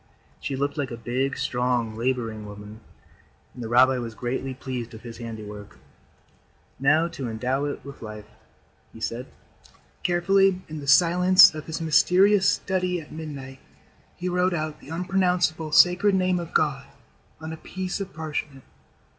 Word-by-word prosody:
She 135 - -4
looked 140 +2 -2
like 140 -3 -1
a 120 - -6
big, 130 +4 -2
strong, 125 -3 -1
laboring 115 -3 -2
woman, 105 +1 -10 0.7
and 125 - -10
the 115 - -5
rabbi 130 +2 +5
was 115 -2 -6
greatly 130 +2 -3
pleased 125 -3 -6
with 110 - -11
his 115 -1 -9
handiwork. 105 -3 -8 1.0
"Now 155 +5 +3
to 130 -7 -5
endow 130 +5 -1
it 145 -2 -5
with 140 0 -10
life," 105 -2 -8 0.7
he - - -12
said. 120 +3 -4 0.7
Carefully, 185 +1 +2
in 155 0 -7
the 140 - -8
silence 180 +4 +7
of 155 -1 -8
his 160 +1 -4
mysterious 190 +5 +4
study 185 -2 -1
at 155 - -12
midnight, 140 -4 -8 0.6
he 180 - -5
wrote 180 0 +1
out 155 -1 -4
the - - -14
Unpronounceable 180 -2 0
Sacred 180 +5 +5
Name 185 -1 +1
of 170 -1 -7
God 150 -4 0 0.5
on 160 0 -6
a - - -7
piece 185 +3 -5
of 195 -1 -5
parchment. 150 -4 -5
145 Hz, 155 wpm, -25 LUFS, 125-175 Hz, 1.0 s, silence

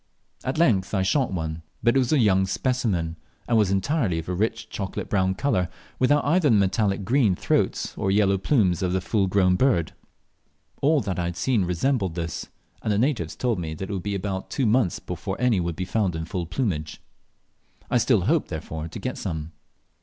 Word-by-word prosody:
At 130 - -2
length 110 - +2
I 95 - +2
shot 130 +5 +1
one, 80 -3 -3 0.2
but 120 +1 +4
it - - +5
was 125 -2 +1
a 155 - +4
young 95 -6 +3
specimen, 95 -8 -1 0.3
and 120 - +2
was 105 -4 +4
entirely 100 - +1
of 80 - -5
a - - 0
rich 110 +4 -1
chocolate 95 -3 -5
brown 95 -2 +2
colour, 95 -9 0 0.3
without 145 +3 +3
either 160 +1 +3
the 115 - +5
metallic 100 0 +1
green 115 -5 +3
throat - - 0
or 95 - -1
yellow 100 -1 +3
plumes 95 - +2
of 90 -1 0
the 95 - +2
full 100 +1 +1
grown 90 -1 +3
bird. 105 -10 +2 0.9
All 150 +1 +3
that 95 -3 -3
I 85 - 0
had 85 0 -3
yet - - -11
seen 115 -8 +1
resembled 95 +1 0
this, 85 -1 -4 0.3
and 110 - -1
the 100 - +2
natives 115 - 0
told 120 -6 0
me 80 -2 -4
that 95 +5 -5
it - - -2
would 95 - -2
be 100 +2 -3
about 95 0 -3
two 135 - 0
months 110 -4 +2
before - - -5
any 125 -5 +3
would 85 -1 -2
be 90 - -3
found 95 -3 0
in 80 0 -3
full 85 -1 -4
plumage. 85 - -2 0.9
I 125 - +4
still 115 -3 +3
hoped, 150 - +1
therefore, 80 -1 -5
to - - -8
get - - -4
some. 80 -1 -4
100 Hz, 205 wpm, -25 LUFS, 90-120 Hz, 0.9 s, it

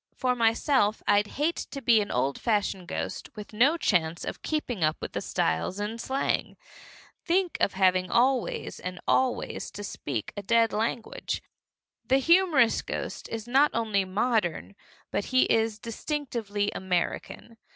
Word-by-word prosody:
For 255 -1 +1
myself, 225 -1 +2
I'd 205 0 +4
hate 310 +4 0
to 280 - -6
be 230 -4 +4
an 205 - -4
old 135 +3 -1
fashioned 205 -5 0
ghost - - -4
with 210 0 -9
no 265 +10 +4
chance 170 - +1
to - - -3
keep 305 -1 -1 0.2
up 155 0 +2
with - - -6
the - - -2
styles 80 - -1
in 215 +3 -3
slang. 265 +3 -1 0.7
Think 360 0 +1
of - - +2
having 185 -1 +2
always 250 +2 +1
and 180 -1 -6
always 260 -1 0
to 205 - -8
speak 135 - -4
a 205 - -4
dead 230 +2 +3
language! 220 +2 -2 0.6
The 265 - +3
humorous 320 -5 +4
ghost - - -5
is 225 0 -5
not 275 +4 +4
only 215 -4 +1
modern, 200 -2 -1 0.4
but 205 - -1
he 255 0 +3
is 225 -1 +1
distinctively 230 -4 -3
American. 190 +5 -3
225 Hz, 150 wpm, -27 LUFS, 195-255 Hz, 0.7 s, I'd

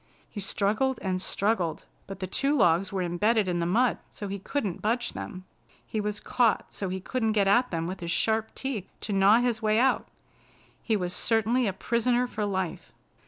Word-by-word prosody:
He 210 - -8
struggled 215 +6 +1
and 185 -1 -1
struggled, 190 -5 -1 0.2
but 195 -1 -7
the 185 - -2
two 275 +10 0
logs 175 -3 +3
were 190 -2 -1
embedded 205 +5 +1
in 175 -1 0
the 170 - 0
mud 235 +6 +2
so 205 - -7
he 200 +1 -4
couldn't 205 -4 -3
budge 235 +3 0
them. 185 0 -7 0.4
He 215 - -2
was 210 0 -2
caught 235 -4 +1
so 195 - -3
he 190 +1 -3
couldn't 225 +2 -1
get 200 -2 +2
at 240 +6 +4
them 165 -1 -2
with 185 +2 -5
his 170 - -5
sharp 220 +5 0
teeth 250 -8 -4
to 210 - -3
gnaw 200 +4 +5
his 240 -3 0
way 215 0 +2
out. 260 +3 +2 0.7
He 220 -3 +1
was 180 -2 -3
certainly 225 +2 +1
a - - +1
prisoner 240 +4 +1
for 220 -4 -3
life. 190 -4 -3
210 Hz, 195 wpm, -27 LUFS, 190-235 Hz, 0.7 s, gnaw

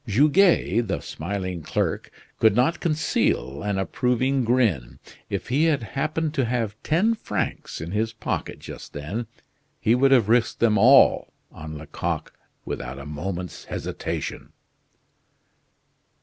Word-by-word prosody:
Goguet, 140 - +3
the 95 - -1
smiling 90 +1 -4
clerk, - - -2 0.3
could 110 -2 +5
not 150 +8 +2
conceal 110 - 0
an 100 -1 -1
approving 125 +7 +1
grin. 100 - +1 0.3
If - - -4
he 145 +6 +3
had 150 -7 +2
happened 155 +7 -2
to 135 -6 +1
have 115 -3 -1
ten 190 +9 +2
francs 225 - -4
in 80 +2 -6
his 110 +2 0
pocket 115 - -4
just - - -10
then 90 +11 -4 0.5
he 110 - +3
would 135 +3 +4
have 125 -6 +5
risked 115 +1 +2
them 110 -3 +3
all 130 +5 +6 0.2
on 80 0 -8
Lecoq 75 0 -4 0.3
without 60 +2 -5
a 70 - -8
moment's 90 +4 -5
hesitation. - - -5
115 Hz, 130 wpm, -24 LUFS, 90-135 Hz, 0.5 s, all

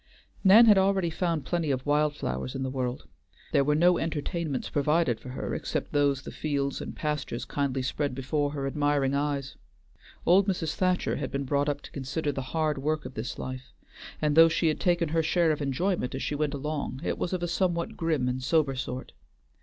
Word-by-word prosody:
Nan 210 +4 +8
had 210 -3 +7
already 190 -3 +2
found 165 -3 -1
plenty 170 -3 -1
of 130 -2 -1
wild 150 0 +2
flowers 65 - -4
in 135 - -2
the 130 - -2
world; 125 - -3 0.4
there 140 - +4
were 150 +2 +2
no 175 +3 +4
entertainments 160 -2 -2
provided 150 -4 +1
for 125 - -10
her 125 - -4
except - - -3
those 140 -2 +2
the - - -7
fields 140 -2 -2
and - - -6
pastures 150 -5 -3
kindly 135 -2 -1
spread 140 +1 -2
before 145 +3 -1
her 140 -1 -4
admiring 145 -1 +1
eyes. 140 -1 -2 0.7
Old 190 +3 +5
Mrs. 165 -5 -1
Thacher 185 -1 0
had 135 -3 -3
been 140 +1 -2
brought 140 +2 +1
up 145 0 -2
to - - -12
consider 140 +2 -2
the 135 - -4 0.2
hard 155 -3 +1
work 155 +2 -1
of - - -7
this 110 +2 -5
life, 130 0 -7 0.5
and 150 -1 +1
though 165 0 +8
she 165 0 +2
had 155 - -1
taken 175 -3 +1
her 165 +1 +2
share 165 +1 +2
of 150 - -2
enjoyment 140 0 -1
as 135 - -3
she - - -2
went 145 0 -1
along, 145 -2 -4
it - - -2
was 175 - -2
of 180 -2 -2
a - - 0
somewhat 175 +3 -1
grim 160 -8 0
and 125 +1 -2
sober 145 +1 +2
sort. 125 0 -5
145 Hz, 205 wpm, -28 LUFS, 135-165 Hz, 0.7 s, Nan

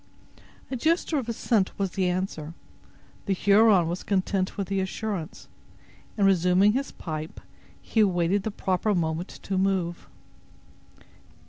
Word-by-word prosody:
A - - -1
gesture 320 +3 +1
of 240 -3 -5
assent 220 -3 0
was 195 -2 -1
the 185 -1 0
answer. 180 -3 -3 0.7
The 200 - +2
Huron 200 -2 +4
was 175 +2 -3
content 190 -1 -1
with 200 -2 -2
the 195 -1 -1
assurance, 190 -3 -4 0.7
and, 200 - +3
resuming 190 +2 +4
his 275 +3 -2
pipe, 155 -1 -6 0.4
he 225 - -2
awaited 190 -1 +2
the 220 - -3
proper 195 +1 0
moment 165 +1 -1 0.2
to 190 -1 -1
move. 185 -3 -1
190 Hz, 130 wpm, -26 LUFS, 180-205 Hz, 0.7 s, Huron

